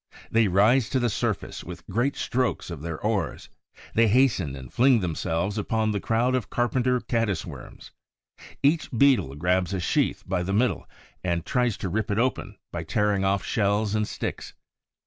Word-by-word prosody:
They 115 -1 +4
rise 110 +6 +4
to 130 - +1
the 120 -2 +1
surface - - -2
with - - -9
great 125 +5 0
strokes 125 -7 -1
of 80 -4 -6
their 80 -1 -5
oars; 105 -5 -2 0.4
they 115 0 +4
hasten 100 - +2
and 65 -2 -10
fling 125 -1 +5
themselves 90 +3 -2
upon 110 +1 0
the 105 - -1
crowd 120 +5 +1
of 125 -6 -1
carpenter 125 +1 +1
Caddis 115 -8 -1
worms. - - -11 0.7
Each 150 +4 +2
Beetle 115 - +3
grabs 90 +4 0
a - - -2
sheath 85 - 0
by 95 -1 -1
the 95 +2 -2
middle 120 +5 0 0.3
and 85 -2 -1
tries 125 -4 +1
to 95 - -4
rip 110 +4 -1
it 100 - 0
open 115 -4 -1
by 85 - -4
tearing 100 +4 0
off 95 0 +1
shells 105 0 0
and 105 -1 0
sticks. - - -5
105 Hz, 170 wpm, -26 LUFS, 90-120 Hz, 0.7 s, fling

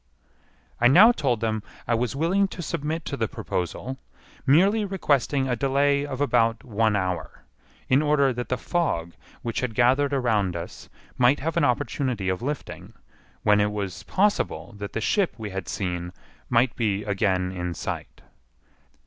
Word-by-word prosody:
I 120 - +6
now 190 - +8
told 130 - -1
them 110 -1 -1 0.3
I 120 - +2
was 120 +3 0
willing 180 +7 +2
to 180 -2 -7
submit 155 +2 -3
to 140 - -3
the 115 -5 -1
proposal, 125 +11 -4 0.5
merely 195 +10 +4
requesting 145 - +1
a 125 - 0
delay 140 +2 +1
of 135 -2 -5
about 115 -5 +2
one 110 -2 +1
hour, 95 -2 -3 0.4
in 130 +3 +4
order 145 -3 +3
that 120 0 -5
the 125 - 0
fog 115 - -1 0.3
which 115 -2 -2
had 120 -4 -3
gathered 130 +3 +3
around 110 -9 +1
us 85 0 -7 0.3
might 125 +3 +4
have 160 +3 -2
an 170 -3 +3
opportunity 125 -5 -1
of 95 -1 -2
lifting, 145 +3 -5 0.5
when 105 0 +4
it 105 0 +1
was 100 -5 -4
possible 200 - 0
that 100 0 -6
the 115 - -2
ship 195 - +1
we 110 -3 -6
had 95 -3 -5
seen 90 -1 -3 0.4
might 120 +1 +3
be 105 -3 0
again 95 -2 0
in 90 -2 -4
sight. - - -6
125 Hz, 160 wpm, -25 LUFS, 105-145 Hz, 0.5 s, now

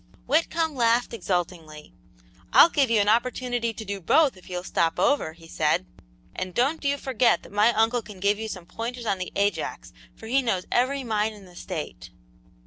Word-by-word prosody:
Whitcomb 325 +1 +1
laughed 235 -2 +2
exultingly. 170 - -4 0.6
"I'll 335 - +8
give 275 -5 +2
you 230 -2 +3
an 205 - +2
opportunity 240 +1 +1
to 220 0 -8
do 200 -1 -5
both 285 - +3
if 185 - -16
you'll 180 -1 -4
stop 165 -3 0
over," 285 - +1
he 165 0 -16
said; 150 - 0 0.5
"and 185 -1 -5
don't 280 +7 +1
you 285 0 +1
forget 255 -3 +1
that - - -14
my 210 +3 +4
uncle 225 +2 +2
can 210 -3 -12
give 200 +2 +1
you 220 - -4
some 185 -5 -7
pointers 235 +5 -6
on 195 -3 0
the 180 - -5
Ajax, 200 +1 -2 0.2
for - - -13
he 260 +5 +2
knows 190 -8 -1
every 265 +3 +1
mine 220 -2 0
in 205 -2 -14
the 180 -1 -17
State." 170 -4 -6
220 Hz, 190 wpm, -25 LUFS, 185-250 Hz, 0.6 s, I'll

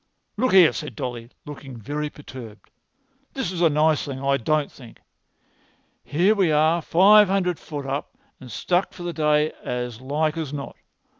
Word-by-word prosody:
"Look 250 +2 0
here," 180 -4 +7
said 150 - -6
Dolly, 120 -2 -5 0.2
looking 135 -3 -9
very 150 +7 -4
perturbed, 125 -7 -12 0.6
"this 265 -10 -3
is 175 -2 -4
a 170 - +5
nice 150 0 +2
thing, 135 -2 -6
I 140 0 +1
don't 150 +3 0
think. 120 -4 -15 1.0
Here 175 +8 +2
we 190 -6 +2
are 155 +3 +3
five[Pg 205 +6 +6
246] - - -8
hundred 180 -3 0
foot 145 -3 -7
up, 140 +2 -5 0.2
and 125 -2 -11
stuck 180 - -1
for 175 - -9
the 175 0 -4
day 150 -1 +2
as 125 -1 -4
like 150 +4 -1
as 155 -4 -4
not. 140 -2 -6
150 Hz, 170 wpm, -23 LUFS, 135-175 Hz, 1.0 s, here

